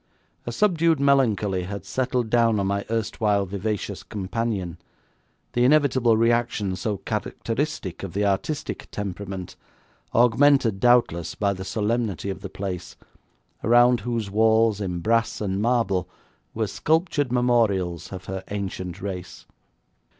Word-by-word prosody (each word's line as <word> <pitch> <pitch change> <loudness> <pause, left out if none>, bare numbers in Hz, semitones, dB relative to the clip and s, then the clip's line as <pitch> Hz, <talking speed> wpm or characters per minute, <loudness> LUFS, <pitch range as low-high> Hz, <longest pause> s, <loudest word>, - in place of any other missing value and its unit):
A - - -1
subdued 165 - +2
melancholy 110 -10 +2
had 100 +2 -6
settled 125 -3 -1
down 115 -3 +3
on 100 - 0
my 100 +1 -1
erstwhile 105 -2 0
vivacious 100 +2 -3
companion, 100 -3 -3 0.7
the 120 - +2
inevitable 130 -4 +4
reaction 115 -4 +1
so 100 +3 -2
characteristic - - -3
of - - -6
the 100 +1 0
artistic 100 +10 -2
temperament, 95 -2 -5 0.6
augmented 120 -2 +4
doubtless 115 -9 +3
by 100 -1 +1
the 95 0 -6
solemnity 105 -2 -1
of 95 - -7
the 100 - -6
place, 95 -2 -5 0.7
around 120 +2 +5
whose 115 -2 -3
walls 110 0 +3
in 90 -3 -3
brass 115 +4 +1
and 100 -1 -1
marble 110 -6 +1 0.5
were - - 0
sculptured 160 -4 0
memorials 105 -9 +1
of 95 -1 -7
her 95 +1 -5
ancient 95 -3 -5
race. 90 -3 -6
105 Hz, 125 wpm, -24 LUFS, 95-120 Hz, 0.7 s, around